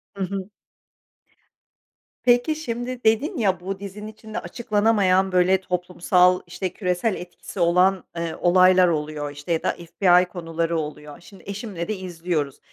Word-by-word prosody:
Hı 195 - -3
hı. 195 +1 -4 1.8
Peki, 245 +5 +3
şimdi 250 -4 -5
dedin 260 - +2
ya, 190 -6 +1
bu 190 +2 -5
dizinin 200 +1 -8
içinde 220 0 -7
açıklanamayan 205 -4 +1
böyle 185 +1 +3
toplumsal, 180 0 +2
işte, 180 +1 -4
küresel 185 +2 -1
etkisi 180 +2 -9
olan, 180 +2 +3
eee, 165 -1 -3
olaylar 185 +1 +5
oluyor, 150 -2 -2
işte, 145 +4 -7
ya 160 - -1
da - - +1
FBI 180 +1 +3
konuları 165 -1 -3
oluyor. 150 -1 -7
Şimdi 195 +2 -16
eşimle 200 -4 -5
de 215 - -2
izliyoruz 170 -6 -3
185 Hz, 135 wpm, -23 LUFS, 170-205 Hz, 1.8 s, olaylar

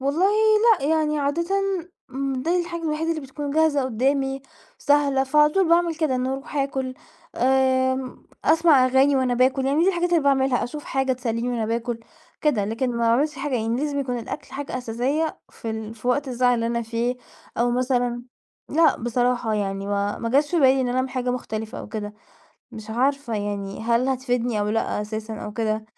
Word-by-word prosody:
والله 285 +8 +2 0.5
لأ، - - -3
يعني 305 -1 +1
عادةً 285 +4 0 0.9
دي 335 +8 +1
الحاجة 340 0 -5
الوحيدة 320 +1 -1
اللي 325 -1 -1
بتكون 285 +1 -6
جاهزة 300 -2 +2
قدَّامي 270 +2 0 0.4
سهلة، 280 -2 +2
فعلى 300 +2 +4
طول 380 -2 +2
باعمِل 340 0 +3
كده 310 -4 0
إني 255 0 -1
أروح 270 +2 -5
آكل 265 -2 -2 0.4
آمم، 260 0 +1 0.2
أسمع 315 -5 +5
أغاني 265 +2 +4
وأنا 255 -2 +1
باكل، 260 +2 +2
يعني 285 +4 +2
دي 365 - +4
الحاجات 355 -2 0
اللي 340 -2 +4
باعملها 270 -2 +2
أشوف 295 +4 -7
حاجة 265 -1 0
تسلِّيني 240 -1 -2
وأنا 235 -3 -1
باكل 230 +1 -2 0.4
كده، 250 -10 +2
لكن 230 +5 -1
ما 240 - -4
باعملش 240 +7 +2
حاجة 285 -1 -2
يعني 230 0 0
لازم 285 +1 -1
يكون 250 -3 -2
الأكل 230 - -7
حاجة 280 -2 -4
أساسية 255 +7 -2
في 225 - -6
ال 220 0 -5
في 230 +2 -5
وقت 275 +3 +1
الزعل 250 0 +2
اللي 230 -1 -1
أنا 235 0 -1
فيه 235 +2 -2 0.4
أو 240 +1 +2
مثلًا 245 -1 0 0.5
لأ 325 +1 +4
بصراحة 240 -1 0
يعني 195 -1 -2
ما 200 0 -1
ما 230 - -3
جاش 285 +4 +2
في 345 - +2
بالي 265 -1 +5
إن 255 - 0
أنا 245 - -1
اعمِل 260 0 -1
حاجة 250 -1 -2
مختلفة 220 -3 -4
أو - - -8
كده 210 -2 -5 0.6
مش 220 0 -9
عارفة 265 +1 0
يعني 205 -1 -4
هل 235 +3 +1
هتفيدني 245 -4 -1
أو 205 - 0
لأ 225 -1 -1
أساسًا 215 +1 -5
أو 210 - -6
كده، 220 -1 -1
255 Hz, 185 wpm, -23 LUFS, 230-285 Hz, 0.9 s, أسمع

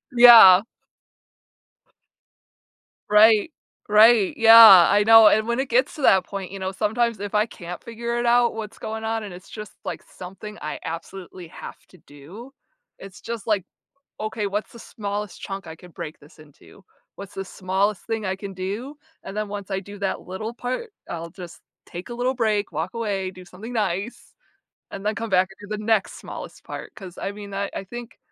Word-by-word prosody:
Yeah. 230 -6 +9 2.5
Right, 215 +6 +5 0.4
right, 215 -1 +5
yeah, 225 -5 +9
I 205 0 +3
know, 225 -1 +8
and 215 +1 +3
when 235 +2 -1
it 275 - -5
gets - - +1
to 305 - -8
that 190 -8 +4
point, 195 -2 -7
you 195 - -7
know, 190 0 -4
sometimes 220 +2 -1
if 205 0 -6
I 210 0 +3
can't 180 -5 -9
figure 235 0 -5
it 240 - -2
out 240 0 +3
what's 220 -1 -7
going 220 0 -6
on, 225 0 -2
and 200 -4 -8
it's, 180 +2 -13
just 210 -2 -9
like, - - -5
something 195 +4 -11
I 150 - -5
absolutely 175 +1 -8
have - - -10
to 185 - -19
do, 165 - -13 0.5
it's 195 -2 -12
just 230 -3 -7
like, 210 -4 +1 0.6
"Okay, 215 -1 -3
what's 205 +2 -4
the 235 - -13
smallest 205 -2 -6
chunk 195 0 -7
I 160 - -9
could 175 +1 -16
break 150 - -8
this 150 +3 -20
into? 155 +6 -18 0.3
What's 200 0 -10
the 195 - -5
smallest 190 +2 -2
thing 225 -2 -3
I 190 0 -2
can 195 -1 -8
do?" 205 +10 -5 0.3
And 200 - -8
then 215 -1 -3
once 200 -1 -7
I 195 0 -2
do 205 +1 -12
that 195 -1 -3
little 215 +5 -6
part, 255 - -5 0.2
I'll 170 0 -6
just 175 -2 -11 0.2
take 175 +4 -9
a 240 - -7
little 250 +2 -1
break, 215 -4 0
walk 160 +7 -4
away, 200 -5 -3
do 185 0 -13
something 200 +6 -10
nice, 205 +1 -3 0.6
and 200 +1 -8
then 215 - 0
come 230 -1 -5
back 185 +1 +3
and 205 - -12
do 215 - -2
the 210 - -8
next 220 -3 +1
smallest - - -10
part. - - -9
'Cause 185 -4 -11
I 195 - -4
mean 205 -1 -10
I 200 0 -2
I - - -4
think, 240 +4 -10
205 Hz, 190 wpm, -23 LUFS, 190-225 Hz, 2.5 s, Yeah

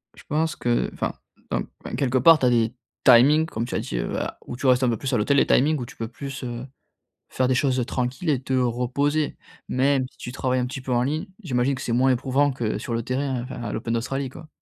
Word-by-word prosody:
Je - - -15
pense 155 +1 0
que 120 -1 0
enfin, - - -2 0.4
dans - - 0 0.4
quelque 130 -2 +1
part, 165 +4 +8
tu 130 - +1
as - - +5
des 115 -1 +2 0.3
timings 135 +6 +7
comme 115 -7 -3
tu 120 - -5
as - - +1
dit, - - -4
heu, - - -2
a - - -4
où - - -6
tu 130 +2 -2
restes 125 0 +4
un 125 - +3
peu 115 - 0
plus 130 - -3
à - - +3
l'hôtel, 140 +7 +2
les - - +4
timings 150 +4 +3
où 125 - -4
tu - - -13
peux 115 - -4
plus, 135 +3 -7
heu, 120 +1 -5 0.6
faire 130 -1 0
des 130 - +3
choses, 130 0 +1
heu, 125 - +1
tranquilles 130 +6 -2
et 135 -3 +1
te 130 - -2
reposer. 130 +5 0 0.3
Même 135 0 +2
si - - -29
tu 125 - -7
travailles 130 0 0
un 125 - 0
petit 135 +2 -6
peu 130 0 -4
en 120 0 +3
ligne, 155 +8 -1 0.2
j'imagine 130 -4 +1
que 130 - -6
c'est 120 - -2
moins 130 +3 +3
éprouvant 135 +3 +2
que 120 -5 -2
sur 120 - -4
le 115 - -1
terrain, 130 +1 -2
enfin 125 -1 -7
à 105 - -4
l'Open 115 - -3
d'Australie, 135 +3 -2
quoi. 155 +4 -12
130 Hz, 260 wpm, -24 LUFS, 120-140 Hz, 0.6 s, part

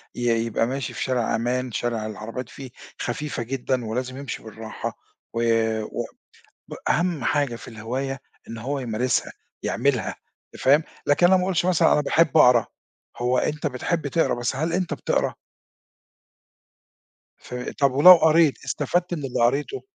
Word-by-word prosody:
ي 120 - -5 0.2
يبقى 115 0 0
ماشي 130 -1 -3
في - - -3
شارع 125 -4 0
أمان، 125 +2 -1
شارع 115 -1 -2
العربيات 110 +4 -6
فيه 130 -3 -10 0.3
خفيفة 120 0 -3
جدًا، 130 0 -2
ولازم 125 +4 -3
يمشي 140 -2 -6
بالراحة، 110 0 -7 0.4
و 115 - -1 0.4
و - - -4 0.9
أهم 170 -6 +1
حاجة 140 -4 +1
في - - -11
الهواية 125 +4 -4 0.3
إن 115 - -6
هو 135 +5 -3
يمارسها، 125 0 -1 0.3
يعملها - - 0 0.4
أنت - - -10
فاهم، 145 +4 +5 0.2
لكن 145 +5 +4
أنا 190 +1 +5
ما 180 - 0
أقولش 180 -2 0
مثلًا 180 -3 +4
أنا - - +3
باحب 160 0 +2
أقرا، 125 -2 +6 0.5
هو 125 +1 +1
أنت 150 +3 -1
بتحب 145 +4 -2
تقرا، 165 +4 +1
بس 120 +1 -2
هل 160 +5 -1
أنت 180 0 -1
بتقرا؟ - - -1 2.0
ف - - -10 0.2
طَب 140 -2 +3
ولو 150 +8 +10
قريت 160 -2 +3
استفدت 175 +5 -1
من 150 -4 -5
اللي 125 -3 -1
قريتُه، 140 - 0
130 Hz, 150 wpm, -24 LUFS, 120-150 Hz, 2.0 s, ولو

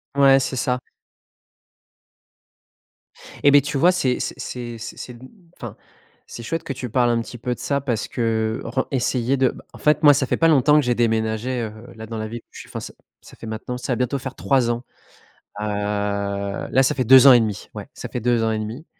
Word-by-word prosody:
Ouais, 135 -1 +6
c'est 130 - -3
ca. 125 +1 0 2.6
Et 145 - +6
beh, 145 0 +7
tu 145 0 -3
vois, 175 +6 +5
c'est 135 -9 0
c - - -3
c'est 120 -2 -6
c 115 +1 -8
c'est 125 - -8
mmh, 130 +2 -13 0.3
enfin, - - -8 0.5
c'est 115 - -9
chouette 165 +6 -3
que 140 -4 -4
tu 125 -3 -6
parles 120 0 +2
un 115 -1 +1
petit 120 - -9
peu 125 +1 -3
de - - -20
ça 140 -1 -1
parce 120 -6 -2
que, 110 -2 -1
heu, - - -7
ren 130 +3 -1
essayer 130 0 0
de 130 -1 +3
bah, - - -10
en - - -11
fait, 150 +1 +2
moi, 145 - +8
ça 140 -1 +1
fait - - 0
pas 165 - +4
longtemps 150 -1 +4
que - - +3
j'ai 120 -1 +1
déménagé, 115 +2 0
heu, 110 - -4 0.2
là, 110 0 -8
dans 115 0 -6
la 110 0 -4
ville 115 +1 -7
où - - -70
je - - -10
suis. - - -15
Enfin, - - -5
ça - - -9 0.3
ça - - -15
fait 115 - -10
maintenant 110 +3 -5
ça 125 +1 -3
va - - 0
bientôt 125 +2 -1
faire 130 0 -7
3 130 -4 +1
ans. 120 +1 -4 0.8
Heu, - - -2
là, 100 +2 -1
ça 130 - +1
fait 130 - 0
2 130 +3 +8
ans 130 - +10
et 120 - +7
1/2. 110 -3 -3
Ouais, - - -8
ça - - -8
fait 125 - -4
2 120 -1 +1
ans 110 - +1
et 110 - -1
1/2 115 +9 -6
125 Hz, 235 wpm, -22 LUFS, 110-135 Hz, 2.6 s, ans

